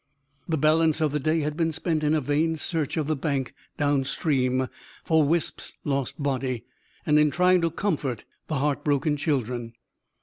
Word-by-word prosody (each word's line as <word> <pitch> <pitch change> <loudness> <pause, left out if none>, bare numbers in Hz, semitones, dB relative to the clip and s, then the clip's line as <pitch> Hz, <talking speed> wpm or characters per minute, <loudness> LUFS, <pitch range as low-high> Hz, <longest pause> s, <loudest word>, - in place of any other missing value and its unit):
The 160 - +1
balance 155 +2 +3
of 155 -2 +1
the 150 - 0
day 155 +3 +1
had 150 0 -2
been 165 0 +1
spent 160 0 -1
in 150 +1 +3
a 155 - +1
vain 150 +4 +1
search 160 -1 -1
of 155 - 0
the 155 +1 0
bank, 140 -2 -2 0.2
downstream, 135 -2 +1 0.4
for 160 -1 +3
Wisp's 160 +2 -1
lost 140 0 -2
body; 130 -3 -1 0.4
and 150 0 +4
in 150 0 +4
trying 180 +3 +3
to 165 - +2
comfort 150 - -2 0.2
the 155 - -2
heart 145 +1 0
broken 145 +1 +1
children. 125 -6 -2
150 Hz, 170 wpm, -26 LUFS, 135-160 Hz, 0.4 s, and